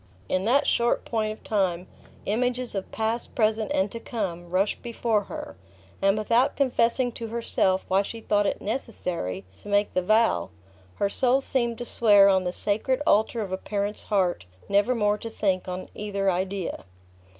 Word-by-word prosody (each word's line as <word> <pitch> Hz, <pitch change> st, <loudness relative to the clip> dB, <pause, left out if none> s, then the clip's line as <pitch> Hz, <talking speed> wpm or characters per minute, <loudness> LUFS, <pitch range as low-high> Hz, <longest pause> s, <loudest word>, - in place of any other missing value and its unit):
In 185 Hz, -, 0 dB
that 265 Hz, +5 st, +3 dB
short 235 Hz, 0 st, +1 dB
point 215 Hz, -2 st, -1 dB
of 215 Hz, -, -10 dB
time, 185 Hz, -4 st, 0 dB, 0.4 s
images 245 Hz, +3 st, -1 dB
of 195 Hz, -2 st, -4 dB
past, 225 Hz, +2 st, -2 dB
present, 220 Hz, -1 st, +1 dB
and 190 Hz, +1 st, +1 dB
to 230 Hz, -, -6 dB
come, 180 Hz, -8 st, -4 dB
rushed 190 Hz, +3 st, 0 dB
before 230 Hz, -3 st, 0 dB
her; -, -, -7 dB, 0.5 s
and 195 Hz, +1 st, +3 dB
without 235 Hz, +6 st, +2 dB
confessing 245 Hz, -2 st, +2 dB
to 230 Hz, 0 st, -6 dB
herself 215 Hz, -4 st, 0 dB
why 190 Hz, +1 st, +3 dB
she 225 Hz, +3 st, -6 dB
thought 205 Hz, -2 st, +1 dB
it -, -, -2 dB
necessary 175 Hz, -, -3 dB, 0.2 s
to -, -, -13 dB
make 205 Hz, 0 st, +1 dB
the 185 Hz, -, +2 dB
vow, 215 Hz, -, +2 dB, 0.5 s
her 200 Hz, -, +1 dB
soul 255 Hz, +5 st, +2 dB
seemed 235 Hz, -4 st, -1 dB
to 240 Hz, -, -5 dB
swear 205 Hz, -4 st, +5 dB
on 190 Hz, -1 st, +3 dB
the 180 Hz, -, 0 dB
sacred 215 Hz, +7 st, 0 dB
altar 220 Hz, +2 st, +3 dB
of 200 Hz, -3 st, -4 dB
a 190 Hz, -, -1 dB
parent's 205 Hz, +1 st, -3 dB
heart, 185 Hz, -, 0 dB, 0.2 s
never 205 Hz, +5 st, +2 dB
more 210 Hz, -2 st, +1 dB
to 230 Hz, -, -6 dB
think 190 Hz, -4 st, -1 dB
on 185 Hz, 0 st, -5 dB
either 200 Hz, -2 st, -1 dB
idea. 185 Hz, -, -3 dB
210 Hz, 170 wpm, -26 LUFS, 190-230 Hz, 0.5 s, swear